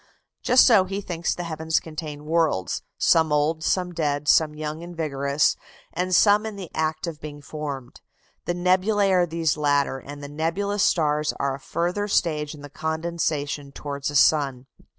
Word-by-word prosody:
Just 250 Hz, -, +6 dB
so 215 Hz, -7 st, +6 dB
he 195 Hz, +2 st, -4 dB
thinks 175 Hz, -4 st, -2 dB
the 175 Hz, -, -5 dB
heavens 160 Hz, -1 st, -1 dB
contain 150 Hz, -2 st, -7 dB
worlds, 155 Hz, -, 0 dB, 0.2 s
some 160 Hz, -2 st, +3 dB
old, 150 Hz, +2 st, +1 dB
some 180 Hz, +1 st, 0 dB
dead, 145 Hz, -3 st, -1 dB
some 155 Hz, 0 st, +4 dB
young 155 Hz, +1 st, -5 dB
and 175 Hz, 0 st, -9 dB
vigorous, 140 Hz, -2 st, +1 dB, 0.4 s
and 180 Hz, +2 st, 0 dB
some 205 Hz, +3 st, +5 dB
in 220 Hz, -1 st, -5 dB
the 190 Hz, -4 st, -8 dB
act 155 Hz, +1 st, -1 dB
of 165 Hz, -3 st, -7 dB
being 150 Hz, -1 st, -8 dB
formed. 140 Hz, -4 st, -7 dB, 0.4 s
The 175 Hz, -, -1 dB
nebulæ 190 Hz, +3 st, +2 dB
are 180 Hz, -1 st, +3 dB
these 160 Hz, -2 st, 0 dB
latter, 145 Hz, -2 st, +1 dB
and 145 Hz, +1 st, -10 dB
the -, -, -5 dB
nebulous 170 Hz, +7 st, -1 dB
stars 150 Hz, -4 st, +2 dB
are 140 Hz, -1 st, 0 dB
a 135 Hz, -, -7 dB
further 180 Hz, +8 st, -2 dB
stage 155 Hz, -6 st, 0 dB
in 145 Hz, -, -13 dB
the 145 Hz, -, -8 dB
condensation 160 Hz, -3 st, -2 dB
towards 140 Hz, 0 st, -4 dB
a 145 Hz, -, -6 dB
sun. 135 Hz, -3 st, +3 dB
160 Hz, 170 wpm, -24 LUFS, 145-175 Hz, 0.4 s, Just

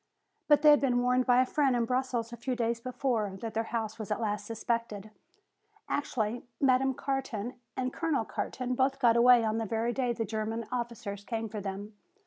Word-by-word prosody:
But 295 Hz, 0 st, +5 dB
they 300 Hz, -, +9 dB
had 295 Hz, -, +5 dB
been 245 Hz, -3 st, +2 dB
warned 250 Hz, +1 st, +2 dB
by 250 Hz, 0 st, +6 dB
a -, -, -3 dB
friend 270 Hz, -1 st, +2 dB
in 235 Hz, -1 st, +1 dB
Brussels 250 Hz, -2 st, -1 dB
a -, -, -3 dB
few 250 Hz, +2 st, -3 dB
days 235 Hz, -1 st, 0 dB
before, 235 Hz, -6 st, -1 dB
that 225 Hz, -2 st, -4 dB
their 225 Hz, +1 st, -1 dB
house 225 Hz, -1 st, -3 dB
was 215 Hz, -, -5 dB
at 210 Hz, -, -1 dB
last 210 Hz, -2 st, -2 dB
suspected. 225 Hz, -2 st, -3 dB, 0.8 s
Actually 235 Hz, -4 st, -1 dB, 0.2 s
Madame 265 Hz, -1 st, +3 dB
Carton 255 Hz, -5 st, -3 dB, 0.2 s
and 255 Hz, 0 st, -1 dB
Colonel 315 Hz, -8 st, 0 dB
Carton 255 Hz, +2 st, -3 dB
both 265 Hz, +2 st, +1 dB
got 240 Hz, -4 st, +4 dB
away 240 Hz, 0 st, +6 dB
on 220 Hz, 0 st, 0 dB
the 225 Hz, -, -1 dB
very 230 Hz, +3 st, -1 dB
day 250 Hz, -2 st, 0 dB
the 230 Hz, -1 st, -2 dB
German 220 Hz, +2 st, -3 dB
officers 235 Hz, -5 st, -4 dB
came 225 Hz, 0 st, -3 dB
for 215 Hz, -1 st, -6 dB
them. 200 Hz, +2 st, -6 dB
235 Hz, 195 wpm, -30 LUFS, 220-255 Hz, 0.8 s, they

